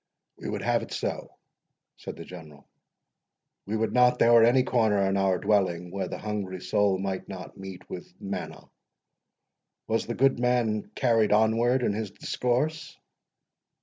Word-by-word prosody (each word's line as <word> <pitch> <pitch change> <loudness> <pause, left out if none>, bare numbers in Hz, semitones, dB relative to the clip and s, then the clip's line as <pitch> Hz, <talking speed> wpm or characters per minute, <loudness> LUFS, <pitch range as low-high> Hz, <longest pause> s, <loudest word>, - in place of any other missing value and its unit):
"We - - -5
would - - -4
have - - +2
it - - -9
so," - - -4 0.6
said - - -8
the - - -9
General; 75 -5 -12 1.0
"we 110 +2 -1
would 110 0 -1
not 125 0 +4
there 120 0 +5
were 115 -1 +8
any 125 +3 +5
corner 105 -6 +2
in 95 - 0
our 95 -1 +2
dwelling 90 -4 0
where 95 -1 -3
the - - -5
hungry 100 -4 -4
soul 95 +1 +1
might 95 0 -4
not 95 -2 -8
meet 95 -1 -10
with 90 - -8
manna. 100 0 -6 1.1
Was 115 +1 -1
the 120 - -3
good 135 -1 +3
man 120 -4 0
carried 115 -4 +2
onward 115 +4 +3
in 105 - +1
his 105 0 -3
discourse?" 145 +10 -2
105 Hz, 155 wpm, -27 LUFS, 95-120 Hz, 1.1 s, were